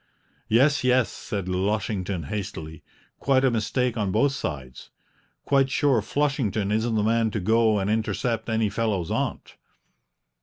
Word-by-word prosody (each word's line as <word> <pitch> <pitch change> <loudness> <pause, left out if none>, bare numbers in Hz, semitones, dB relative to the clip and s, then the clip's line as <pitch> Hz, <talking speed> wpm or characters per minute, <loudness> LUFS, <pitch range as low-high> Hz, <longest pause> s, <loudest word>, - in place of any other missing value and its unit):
"Yes, 140 +6 +3
yes," 125 -1 +3
said 100 -3 -5
Lushington 95 -1 -1
hastily, 80 -3 -6 0.4
"quite 135 -1 +2
a 130 - +3
mistake 120 +2 -1
on 100 -3 0
both 125 +8 +3
sides. 70 - -6 0.6
Quite 135 -1 +3
sure 135 -3 +2
Flushington 115 -6 -1
isn't 110 +2 0
the 105 - +1
man 115 +1 +2
to 105 - -3
go 110 +2 +3
and 95 -1 -1
intercept 115 +1 -1
any 110 -1 +1
fellow's 105 -6 -1
aunt." - - -3
110 Hz, 140 wpm, -25 LUFS, 100-125 Hz, 0.6 s, Yes